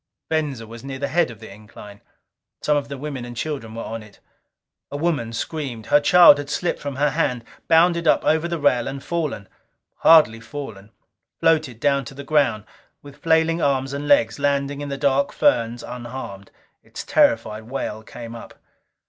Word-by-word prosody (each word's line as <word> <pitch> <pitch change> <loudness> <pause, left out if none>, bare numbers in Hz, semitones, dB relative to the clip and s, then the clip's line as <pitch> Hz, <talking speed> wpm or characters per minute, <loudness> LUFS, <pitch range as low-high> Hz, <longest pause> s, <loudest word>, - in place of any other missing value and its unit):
Venza 145 -7 -1
was 115 +2 -11
near 135 -1 -6
the 140 +1 -2
head 165 +2 +2
of 115 -3 -11
the 110 - -11
incline. 105 0 -13 0.6
Some 150 - +2
of 145 -1 -1
the 140 -1 -6
women 140 -2 -5
and 120 -1 -9
children 125 -6 -4
were 115 - -5
on 115 0 -6
it. 105 -1 -17 0.7
A 145 - -5
woman 145 -8 -1
screamed. 120 -2 -5
Her 145 - +4
child 175 +1 +7
had 145 -1 -6
slipped 175 +4 -2
from 140 -2 -5
her 145 +1 +1
hand; 125 -5 -1 0.2
bounded 170 0 +4
up - - +3
over 160 +2 +2
the 170 0 -2
rail 130 -5 +2
and 135 0 -6
fallen. 155 - -3 0.5
Hardly 155 -9 +6
fallen 115 -5 -8 0.5
floated 155 -8 +1
down 140 +1 +1
to 135 - -10
the 140 - -8
ground, 135 -7 +1 0.4
with 145 -1 -13
flailing 165 +1 +2
arms 135 -1 0
and 145 +1 -4
legs, 145 -3 +3
landing 140 0 0
in 145 - -5
the 140 - -4
dark 140 0 +1
ferns 115 0 +1
unharmed. 120 -5 -8 0.3
Its - - -9
terrified 110 -1 +1
wail 110 -5 -4
came 115 +1 -10
up. 115 - -11
140 Hz, 180 wpm, -22 LUFS, 115-150 Hz, 0.7 s, child